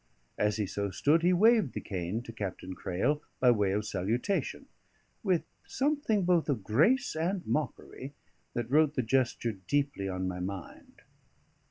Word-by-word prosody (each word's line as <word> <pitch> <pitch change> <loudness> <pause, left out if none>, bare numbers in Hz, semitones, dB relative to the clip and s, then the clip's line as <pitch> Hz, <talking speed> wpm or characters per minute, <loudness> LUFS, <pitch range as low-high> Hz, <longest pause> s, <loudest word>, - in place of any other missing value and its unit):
As 105 0 +2
he 105 - 0
so 100 +1 -2
stood, 145 - +2
he 175 +2 +4
waved 210 - +4
the - - -3
cane 95 +3 -3
to 115 - -9
Captain 95 -3 -5
Crail 130 +13 -1 0.2
by 125 -1 +6
way 105 -4 +2
of 105 +2 -1
salutation, 110 - -1 0.6
with 185 -5 +1 0.2
something 275 -8 +1
both 175 -3 +2
of 125 -8 0
grace 160 - +3
and 175 +4 -1
mockery 140 -1 -3 0.4
that 120 0 -3
wrote 155 0 +4
the 130 - +1
gesture 120 -1 +1
deeply 100 +2 -1
on 95 0 -2
my 90 -1 -4
mind. 95 -1 -7
125 Hz, 155 wpm, -30 LUFS, 100-165 Hz, 0.6 s, by